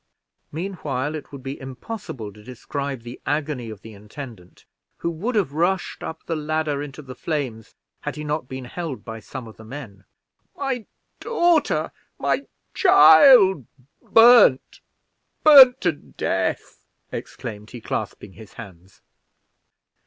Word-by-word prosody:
Meanwhile 155 -5 -4
it 155 -2 -8
would 140 -2 -10
be 135 +1 -6
impossible 130 - -7
to 105 +1 -16
describe 135 +2 -6
the 120 +1 -10
agony 145 -5 -2
of 105 -2 -10
the 110 - -11
intendant, 105 -2 -12 0.3
who 170 - -3
would 210 +10 -4
have 180 -10 0
rushed 175 +4 -1
up 160 - -7
the 165 - -2
ladder 155 -1 -2
into 145 +1 -8
the 130 -1 -9
flames, 130 -9 -5 0.2
had - - -5
he 150 - -6
not 150 -2 -3
been 130 -1 -7
held 155 +1 -6
by 115 0 -7
some 125 +2 -9
of 110 - -14
the 110 - -13
men. 110 -6 -10 0.5
"My 265 -5 -3 0.3
daughter! 345 -9 +1 0.3
my - - -1 0.3
child! 260 - +7 0.3
burned 225 - +5 0.6
burned 270 -5 +9
to 175 - +2
death!" 145 - -4 0.3
exclaimed 110 -4 -7
he, 125 - -9
clasping 105 -3 -5
his 110 0 -14
hands. 95 -4 -13
145 Hz, 135 wpm, -22 LUFS, 115-175 Hz, 0.6 s, burned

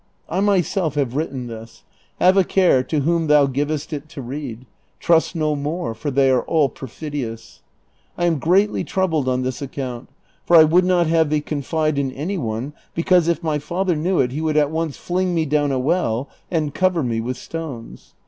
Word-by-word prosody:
I 180 - -2
myself 190 -5 +1
have 135 -4 -1
written 140 -4 -3
this: 115 -1 -10 0.4
have 185 +1 +5
a 195 - +5
care 180 -8 +3
to 145 +3 -1
whom 165 +2 +1
thou 150 -1 +5
givest 145 +3 -2
it 150 +1 -6
to 155 -4 -8
read: 130 -2 -6 0.3
trust 165 +1 +2
no 155 -2 0
Moor, 145 -3 -3
for 130 +7 -4
they 135 -1 +3
are 130 - +3
all 155 -4 +2
perfidious. 130 -3 -7 0.5
1 175 - 0
ani 170 -1 +2
greatly 185 +8 +2
troubled 160 -8 0
on 130 0 0
this 130 0 -3
account, 130 -3 -5 0.3
for 170 - +5
1 155 -1 +7
would 180 +2 +5
not 180 -2 +3
have 160 -1 +2
thee 150 0 +2
confide 150 +1 -1
in 135 -2 -1
any 175 +8 -3
one, 120 +3 -3 0.2
because 170 0 +3
if 170 0 0
my 155 -2 0
father 175 +4 -1
knew 175 +4 0
it 125 - +2
he 150 +4 -3
would 155 -1 0
at 150 -1 +3
once 160 -2 -2
fling 180 0 -1
me 160 -1 +1
down 145 -1 +1
a 135 - 0
well 135 -3 0 0.2
and 155 -4 -1
cover 185 -4 +1
me 115 -2 -1
Avith 125 +3 -3
stones. 140 -4 -8
150 Hz, 195 wpm, -21 LUFS, 135-170 Hz, 0.5 s, 1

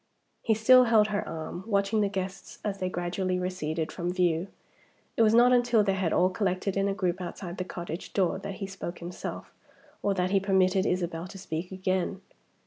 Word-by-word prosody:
He 220 - +2
still 255 +4 +7
held 220 -2 +4
her 205 -1 -2
arm, 165 +3 -6
watching 200 0 +1
the 200 - +2
guests 190 0 -5
as 200 -2 -2
they 185 - -1
gradually 180 +1 -2
receded 165 -3 -2
from 175 -1 -3
view. 175 -1 +1 0.7
It - - +2
was 220 0 +5
not 245 +1 +6
until 240 -3 +4
they 195 -1 +1
had 190 -4 0
all 185 +1 +3
collected 185 0 -1
in 195 0 +1
a 200 - 0
group 185 -1 -1
outside 175 0 -6
the 185 - -2
cottage 175 -1 -6
door 190 -1 +1
that 195 0 -6
he 195 - -5
spoke 190 -2 -6
himself, 175 +1 -7 0.5
or 200 -1 +1
that 185 0 0
he 195 - +4
permitted 190 0 +2
Isabel 175 -1 -2
to 195 - -10
speak 180 -1 -5
again. 185 0 -1
190 Hz, 195 wpm, -28 LUFS, 180-200 Hz, 0.7 s, still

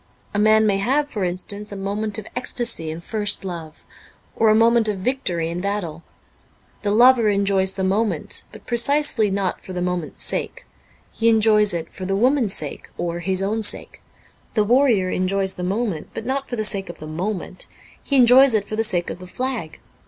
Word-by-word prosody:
A 205 - 0
man 215 +1 +5
may 200 -2 +2
have, 280 +8 0
for 205 - -3
instance, 200 +4 -4
a - - -6
moment 205 +2 -3
of 215 - -6
ecstasy 240 -9 0
in 160 +2 -6
first 205 +1 -1
love, 165 -4 -8 0.5
or 225 - +3
a 215 - +5
moment 230 0 +4
of 210 -2 -1
victory 185 -7 -1
in 170 +2 -4
battle. 185 -5 -3 0.8
The 205 - -1
lover 235 +1 +5
enjoys 195 -1 +1
the 190 - -3
moment, 195 -3 -1
but - - -14
precisely 245 -2 +2
not 195 -1 -2
for 185 - -9
the 180 - -3
moment's 180 -3 -3
sake. - - -1 0.5
He 230 0 +2
enjoys 215 -2 +4
it 165 -2 -4
for 185 - -6
the 195 +1 -1
woman's 245 -1 +2
sake, 150 -2 -4
or 170 0 -3
his 190 +2 -1
own 215 +3 -1
sake. 210 - -3 0.5
The 215 - +3
warrior 225 -5 +3
enjoys 190 +1 0
the 180 - -6
moment, 195 -3 -2
but 225 - -5
not 270 +2 -2
for 245 - -3
the 215 - -2
sake 195 -3 0
of 175 - -8
the 155 - -9
moment; 180 +4 -4 0.3
he 280 - -1
enjoys 255 0 +7
it 205 -2 0
for 215 - -4
the 225 - +1
sake 180 -6 +1
of - - -8
the 185 - -10
flag. 245 -6 -4
205 Hz, 195 wpm, -21 LUFS, 185-230 Hz, 0.8 s, enjoys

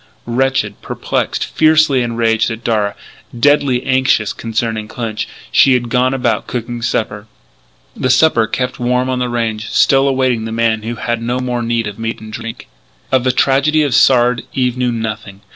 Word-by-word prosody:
Wretched, 135 +3 -1
perplexed, - - -2
fiercely 155 -4 +3
enraged 115 -1 +1
at 115 0 -6
Darragh, 105 -3 0 0.4
deadly 140 -2 +3
anxious 130 -5 +2
concerning 110 -1 -3
Clinch, 110 -1 -4 0.2
she 135 - +5
had 120 -1 -2
gone 125 +1 +2
about 125 -3 -1
cooking 120 0 -4
supper. 110 -2 -2 0.7
The 130 - -1
supper, 125 -4 +4
kept 125 +2 -3
warm 125 +1 0
on 130 - -1
the 125 -1 -1
range, 115 -2 -2
still 135 0 +3
awaited 130 -4 +1
the 110 - -5
man 115 -1 0
who 115 +2 -5
had 120 +1 -3
no 120 +2 -2
more 125 -1 -2
need 115 -1 -1
of 105 +1 -7
meat 115 0 -3
and 110 0 -11
drink. 115 0 -7 0.4
Of 130 -2 +3
the 130 - +2
tragedy 145 +4 +2
of 140 -4 -1
Sard 120 -1 +4
Eve 125 -2 0
knew 125 -1 0
nothing. 110 -3 -5
120 Hz, 170 wpm, -16 LUFS, 115-130 Hz, 0.7 s, she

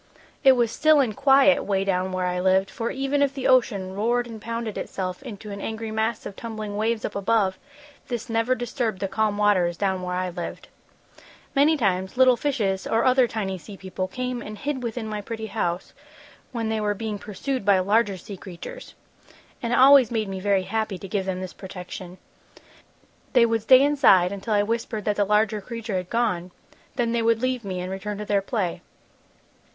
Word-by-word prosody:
"It 265 - +8
was 240 -3 +1
still 310 +2 +4
and 235 -7 +1
quiet 275 +1 +5
'way 195 -1 0
down 185 -1 0
where 185 0 -1
I 180 0 -1
lived, 190 +1 +2
for 230 +2 -3
even 275 +2 -1
if 275 -1 +1
the 265 - -4
ocean 205 -7 +2
roared 235 +4 +1
and 225 -2 -9
pounded 230 -1 -4
itself 185 -1 -4
into 215 -5 -8
an 200 0 -6
angry 220 0 -4
mass 220 0 -1
of 200 - -7
tumbling 215 -2 -6
waves 220 +1 0
up 205 - -5
above, 200 -2 +1 0.5
this 240 -1 -4
never 230 +2 +1
disturbed 240 -4 -2
the 195 - -1
calm 205 +1 0
waters 185 -5 +2
down 190 -2 0
where 180 0 -3
I 185 0 -2
lived. 175 -1 -7 0.9
"Many 300 +3 +4
times, 190 -3 -1
little 255 -1 +6
fishes 225 -8 -1
or 225 +1 +1
other 255 -1 +5
tiny 195 -5 -3
sea 195 +5 -11
people 190 0 -4
came 250 +4 -4
and 215 -2 -8
hid 280 +2 -3
within 235 -1 -4
my 210 -1 -4
pretty 220 +1 -5
house 180 -5 -3 0.6
when 230 -3 -2
they 220 -1 -1
were 210 -1 0
being 215 -1 -4
pursued 235 +5 -4
by 200 -1 +4
larger 200 +1 +2
sea 195 +2 -9
creatures. 200 - -10 0.7
And 235 - -2
it - - +2
always 265 -2 +7
made 220 -3 -1
me 190 -1 -4
very 195 -1 +1
happy 215 0 -2
to 195 - -9
give 195 0 -2
them 185 -1 -2
this 185 -1 -6
protection. 180 -1 -9 1.2
"They 245 -3 +6
would 225 -1 0
stay 255 +4 +7
inside 250 -11 +5
until 200 +2 -2
I 205 - +3
whispered 225 -1 -3
that 210 -1 0
the 205 - +3
larger 210 +1 +2
creature 230 -2 -4
had 180 -1 -5
gone, 215 -7 0 0.5
then 240 -2 0
they 235 0 +1
would 230 0 +2
leave 255 -2 0
me 185 -2 -4
and 180 +1 -5
return 200 +2 -4
to 210 - -5
their 200 -1 +1
play. 195 -4 -2
215 Hz, 200 wpm, -24 LUFS, 190-235 Hz, 1.2 s, It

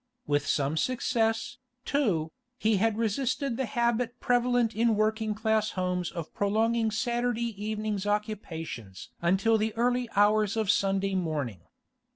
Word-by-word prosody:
With 145 -1 0
some 145 +2 +1
success, 230 - 0 0.3
too, 195 - 0 0.3
he 220 -3 +2
had 220 +2 +1
resisted 240 +3 0
the 265 0 -2
habit 235 +2 0
prevalent 245 -2 +2
in 230 0 +3
working 215 0 0
class 220 0 +1
homes 180 -1 -1
of 165 -2 -7
prolonging 225 +3 +1
Saturday 235 +1 -1
evening's 215 -2 -2
occupations 165 - -4
until 195 +6 +3
the 215 0 -1
early 245 +1 +1
hours 210 +1 +3
of 215 -3 +3
Sunday 195 -1 +1
morning. 150 - -2
215 Hz, 130 wpm, -28 LUFS, 195-235 Hz, 0.3 s, in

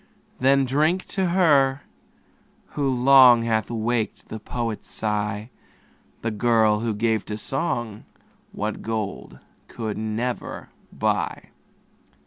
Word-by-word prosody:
Then 135 +1 +3
drink 155 +8 +1
to 190 -2 0
her, 145 -7 +3 0.9
who 140 -2 -1
long 125 -2 +6
Hath 110 -3 0
waked 115 -1 -2
the 110 - -6
poet's 115 -1 -4
sigh, 105 +1 -3 0.7
The 115 - -1
girl, 110 -1 +2
who 115 -1 -2
gave 110 0 0
to 105 - -4
song 120 -4 -3 0.5
What 105 +1 -4
gold 105 - -4 0.3
could 110 -2 -5
never 110 +3 -4 0.2
buy. - - -2
115 Hz, 110 wpm, -23 LUFS, 110-135 Hz, 0.9 s, long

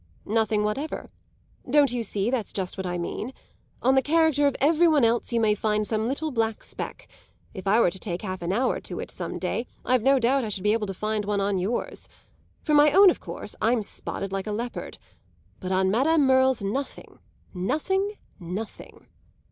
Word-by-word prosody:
"Nothing 215 -1 +1
whatever. 270 +9 -3 0.6
Don't 285 -1 +4
you 245 -1 -1
see 210 0 -1
that's 245 -5 -2
just 185 -2 -3
what 190 -1 -4
I 175 0 -2
mean? 215 +8 -4 0.5
On 260 - +4
the 265 - +4
character 305 -1 +3
of 280 - 0
every 320 +4 +4
one 300 -6 +4
else 235 +2 +1
you 235 - +1
may 215 -2 +3
find 210 0 0
some 220 +1 -1
little 295 +4 -2
black 225 -3 -1
speck; - - -7 0.5
if 190 -1 -7
I 215 +4 +4
were 180 - +4
to 190 - -9
take 180 -1 -4
half 185 -2 -4
an 170 +1 -2
hour 250 +6 +1
to - - -6
it, - - -5
some - - -5
day, 240 - -2 0.2
I've 255 -1 +3
no 270 +4 +4
doubt 260 +2 +2
I 220 - -3
should 195 -2 -3
be 210 0 +3
able 220 -2 -1
to 195 - -4
find 215 +2 -2
one 205 0 -1
on 200 -1 0
yours. 205 +7 -3 0.5
For 305 - 0
my 295 0 +6
own, 390 +3 +8
of - - -6
course, - - -7
I'm 230 -1 +2
spotted 195 -1 -5
like 195 +1 -3
a - - -2
leopard. 235 +3 -5 0.6
But 185 - -5
on 190 0 +2
Madame 285 +7 +3
Merle's 260 -3 +3
nothing, 260 +8 -5 0.3
nothing, 315 - -1 0.3
nothing!" 185 +5 -7
225 Hz, 200 wpm, -25 LUFS, 200-270 Hz, 0.6 s, own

